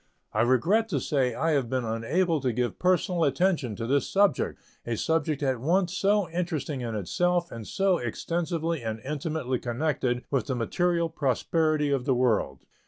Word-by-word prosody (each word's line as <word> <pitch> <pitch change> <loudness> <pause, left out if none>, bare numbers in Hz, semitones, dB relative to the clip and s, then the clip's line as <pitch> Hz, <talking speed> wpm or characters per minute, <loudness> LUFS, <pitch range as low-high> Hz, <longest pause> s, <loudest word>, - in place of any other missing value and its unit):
I - - +2
regret 165 - +3
to 150 -8 0
say 130 -3 0
I 165 - +1
have 135 -6 +1
been 130 -1 -1
unable 150 +9 0
to 130 -2 +1
give 120 +1 -2
personal 180 -1 +2
attention 155 - +1
to 115 - -4
this 140 +4 +1
subject 195 -8 +2 0.2
a 115 -1 -3
subject 155 -1 0
at 130 -3 0
once 180 +6 +1
so 200 0 +2
interesting 165 -5 -2
in 115 -2 -3
itself 175 - 0
and 115 -2 -7
so 190 -2 +1
extensively 165 +6 -2
and 110 -1 -4
intimately 145 -2 -2
connected 125 -1 -1
with 135 -6 0
the 130 - -1
material 170 +8 +1
prosperity 155 +1 0
of 135 -3 0
the 135 -3 +2
world. 110 - 0
145 Hz, 170 wpm, -27 LUFS, 125-170 Hz, 0.2 s, regret